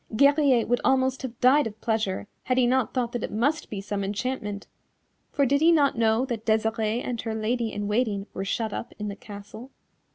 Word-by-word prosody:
Guerrier 280 -2 +4
would 245 +2 +1
almost 260 0 +2
have 245 -3 -7
died 260 +1 +5
of 215 -1 -10
pleasure 220 -4 -1 0.2
had 255 - +1
he 255 - +4
not 255 -1 +1
thought 245 -2 -1
that 240 - -3
it - - -4
must 270 +9 0
be 205 - -4
some 200 0 -3
enchantment, 210 0 -3 0.7
for 280 - +2
did 280 +3 +2
he 330 +2 +6
not 290 -4 +3
know 225 +2 +2
that 235 -4 -4
Desirée 220 +1 0
and 240 -2 -2
her 225 -1 -3
Lady 225 +1 -1
in 205 0 -3
Waiting 210 -2 0
were 195 - -3
shut 220 +2 -2
up - - -5
in 210 -1 -4
the 200 - -5
castle. 210 +4 -10
230 Hz, 205 wpm, -26 LUFS, 210-260 Hz, 0.7 s, he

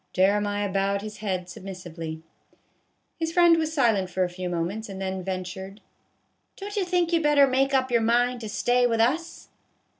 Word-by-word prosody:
Jeremiah 205 +2 +2
bowed 195 +1 0
his 215 0 -7
head 190 -4 -3
submissively. 175 -4 -8 1.0
His 325 0 -1
friend 345 -1 +6
was 315 -1 -1
silent 225 - +2
for 185 +1 0
a 180 - -1
few 180 0 -5
moments, 180 +6 -3
and 190 -1 -7
then 190 -1 -3
ventured, 190 +2 -5 0.4
" - - -47
Don't 410 +1 -7
you 405 - +1
think 355 -1 0
you 335 - +4
'd - - -4
better 295 -1 +5
make 270 +1 +1
up 260 -1 +1
your 235 -1 +3
mind 240 +2 +2
to 220 - -6
stay 245 +3 +2
with 230 -1 0
us 305 +9 -1
210 Hz, 185 wpm, -25 LUFS, 190-270 Hz, 1.0 s, friend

